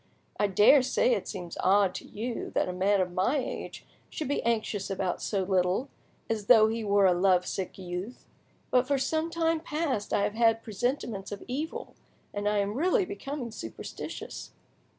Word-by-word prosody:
I 205 Hz, -, +3 dB
daresay 260 Hz, -, +5 dB
it -, -, -2 dB
seems 175 Hz, -2 st, -6 dB
odd 195 Hz, 0 st, +4 dB
to -, -, -7 dB
you 230 Hz, +3 st, -4 dB
that -, -, +2 dB
a 180 Hz, -, -3 dB
man 195 Hz, +2 st, +2 dB
of 180 Hz, -1 st, -1 dB
my 190 Hz, +11 st, +1 dB
age 260 Hz, -, -5 dB, 0.2 s
should 310 Hz, -, -4 dB
be 285 Hz, -, 0 dB
anxious 215 Hz, -3 st, -1 dB
about 190 Hz, -2 st, -2 dB
so 195 Hz, -3 st, -1 dB
little, 185 Hz, +7 st, +1 dB, 0.4 s
as 215 Hz, -3 st, -3 dB
though 220 Hz, -3 st, +7 dB
he 225 Hz, 0 st, -2 dB
were 200 Hz, -1 st, +3 dB
a 185 Hz, -, +5 dB
love 180 Hz, 0 st, +3 dB
sick 190 Hz, -2 st, -4 dB
youth; 185 Hz, +5 st, -6 dB, 0.5 s
but 250 Hz, 0 st, +3 dB
for 280 Hz, -1 st, +2 dB
some 315 Hz, +4 st, 0 dB
time 330 Hz, -1 st, +1 dB
past 300 Hz, -9 st, -2 dB
I 200 Hz, -, +2 dB
have 205 Hz, 0 st, 0 dB
had 225 Hz, 0 st, +3 dB
presentiments 220 Hz, -2 st, -3 dB
of 200 Hz, -, -6 dB
evil, 290 Hz, +6 st, -4 dB, 0.4 s
and 205 Hz, 0 st, 0 dB
I 210 Hz, -, +1 dB
am 200 Hz, 0 st, 0 dB
really 360 Hz, -, +2 dB
becoming 285 Hz, -, -5 dB
superstitious!" 115 Hz, -, -7 dB
215 Hz, 175 wpm, -28 LUFS, 195-265 Hz, 0.5 s, though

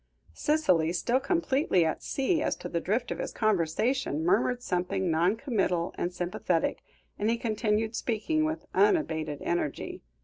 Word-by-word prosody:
Cicely, 185 Hz, -, +2 dB
still 235 Hz, +9 st, +1 dB
completely 270 Hz, -, +2 dB
at 160 Hz, -, -1 dB
sea 295 Hz, +4 st, 0 dB
as -, -, 0 dB
to -, -, -7 dB
the 170 Hz, -, -1 dB
drift 225 Hz, +8 st, -1 dB
of -, -, -3 dB
his -, -, -3 dB
conversation, 205 Hz, -, 0 dB
murmured 240 Hz, +7 st, +2 dB
something 180 Hz, -1 st, -1 dB
non 170 Hz, +6 st, +3 dB
committal 195 Hz, -, -1 dB
and 175 Hz, -, -2 dB
sympathetic, 175 Hz, -1 st, -1 dB, 0.4 s
and 210 Hz, +2 st, +1 dB
he 235 Hz, -, +2 dB
continued 220 Hz, -1 st, 0 dB
speaking 250 Hz, +9 st, 0 dB
with 315 Hz, +1 st, -2 dB
unabated 165 Hz, -, +1 dB
energy. 170 Hz, -5 st, -2 dB
215 Hz, 145 wpm, -28 LUFS, 175-260 Hz, 0.4 s, non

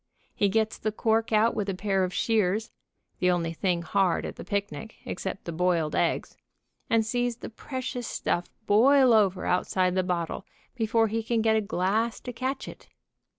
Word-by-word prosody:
He 200 Hz, -, +2 dB
gets 220 Hz, +2 st, 0 dB
the 215 Hz, -, -1 dB
cork 225 Hz, +1 st, 0 dB
out 220 Hz, +2 st, +4 dB
with 205 Hz, -1 st, -2 dB
a 195 Hz, -, -2 dB
pair 195 Hz, 0 st, 0 dB
of 180 Hz, -, -1 dB
shears, 215 Hz, +1 st, 0 dB, 0.5 s
the 180 Hz, -, +3 dB
only 170 Hz, -2 st, 0 dB
thing 175 Hz, 0 st, -1 dB
hard 185 Hz, +1 st, +1 dB
at -, -, -6 dB
the -, -, -8 dB
picnic, 205 Hz, +2 st, -4 dB
ex -, -, -5 dB
cept 190 Hz, 0 st, -5 dB
the 170 Hz, -, -4 dB
boiled 170 Hz, -2 st, 0 dB
eggs, -, -, 0 dB, 0.5 s
and 225 Hz, -1 st, +3 dB
sees 245 Hz, +1 st, -1 dB
the -, -, -8 dB
precious 255 Hz, 0 st, -5 dB
stuff 175 Hz, -, -2 dB, 0.2 s
boil 255 Hz, +4 st, +5 dB
over 195 Hz, -4 st, +3 dB
outside 180 Hz, 0 st, +1 dB
the 185 Hz, -, +2 dB
bottle 180 Hz, 0 st, -2 dB, 0.3 s
before 225 Hz, -1 st, +2 dB
he 225 Hz, +2 st, -1 dB
can 225 Hz, 0 st, 0 dB
get 220 Hz, -1 st, +3 dB
a 220 Hz, -, +2 dB
glass 210 Hz, +3 st, 0 dB
to 250 Hz, -, -6 dB
catch 260 Hz, +3 st, -3 dB
it. -, -, -11 dB
215 Hz, 185 wpm, -27 LUFS, 185-225 Hz, 0.5 s, boil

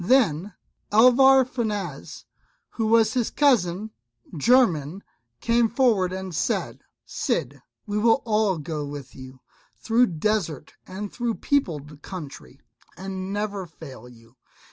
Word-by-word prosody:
Then 200 Hz, -, +2 dB, 0.4 s
Alvar 255 Hz, +4 st, +6 dB
Fanez, 210 Hz, -, -5 dB, 0.5 s
who 225 Hz, -2 st, -2 dB
was 225 Hz, 0 st, +4 dB
his 245 Hz, -3 st, 0 dB
cousin 215 Hz, -7 st, +1 dB, 0.4 s
german, 180 Hz, -, +2 dB, 0.4 s
came 235 Hz, 0 st, +2 dB
forward 220 Hz, -7 st, +2 dB
and 190 Hz, -1 st, -6 dB
said, 160 Hz, -, -2 dB, 0.3 s
"Cid, -, -, -3 dB, 0.2 s
we 210 Hz, -1 st, -2 dB
will 230 Hz, +4 st, +3 dB
all 210 Hz, -4 st, +1 dB
go 150 Hz, 0 st, -5 dB
with 140 Hz, -3 st, -8 dB
you, 130 Hz, -1 st, -12 dB, 0.4 s
through 235 Hz, +2 st, +2 dB
desert 165 Hz, -4 st, -2 dB
and 200 Hz, +2 st, -7 dB
through 240 Hz, -2 st, -2 dB
peopled 150 Hz, -, -2 dB
country, 145 Hz, -, -9 dB, 0.4 s
and 190 Hz, 0 st, -6 dB
never 205 Hz, -2 st, -3 dB
fail 135 Hz, -7 st, -12 dB
you. 115 Hz, +1 st, -20 dB
195 Hz, 120 wpm, -24 LUFS, 155-230 Hz, 0.5 s, Alvar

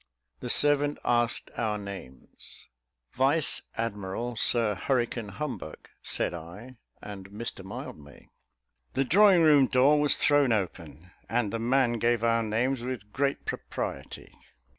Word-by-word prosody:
The -, -, -6 dB
servant 145 Hz, 0 st, +4 dB
asked 120 Hz, -1 st, +1 dB
our 110 Hz, -3 st, -1 dB
names. 100 Hz, -11 st, -8 dB, 0.5 s
"Vice 140 Hz, +4 st, +2 dB, 0.2 s
Admiral 115 Hz, +1 st, -3 dB
Sir 115 Hz, -1 st, +1 dB
Hurricane 120 Hz, +1 st, -1 dB
Humbug," 125 Hz, -, -7 dB
said -, -, -1 dB
I, 90 Hz, +10 st, -10 dB, 0.3 s
"and 95 Hz, -2 st, -9 dB
Mr 105 Hz, -1 st, -5 dB
Mildmay." 75 Hz, -6 st, -10 dB, 0.7 s
The 135 Hz, -, +1 dB
drawing 185 Hz, +4 st, +5 dB
room 145 Hz, -4 st, +6 dB
door 140 Hz, +3 st, +4 dB
was 150 Hz, -, +4 dB
thrown 145 Hz, -3 st, +3 dB
open, 90 Hz, -4 st, -4 dB, 0.2 s
and 115 Hz, -2 st, 0 dB
the 115 Hz, -, -2 dB
man 120 Hz, 0 st, +1 dB
gave 115 Hz, 0 st, +1 dB
our 115 Hz, 0 st, +3 dB
names 120 Hz, +4 st, 0 dB
with 120 Hz, -4 st, -6 dB
great 140 Hz, +1 st, -1 dB
propriety. -, -, -6 dB
120 Hz, 125 wpm, -28 LUFS, 105-135 Hz, 0.7 s, room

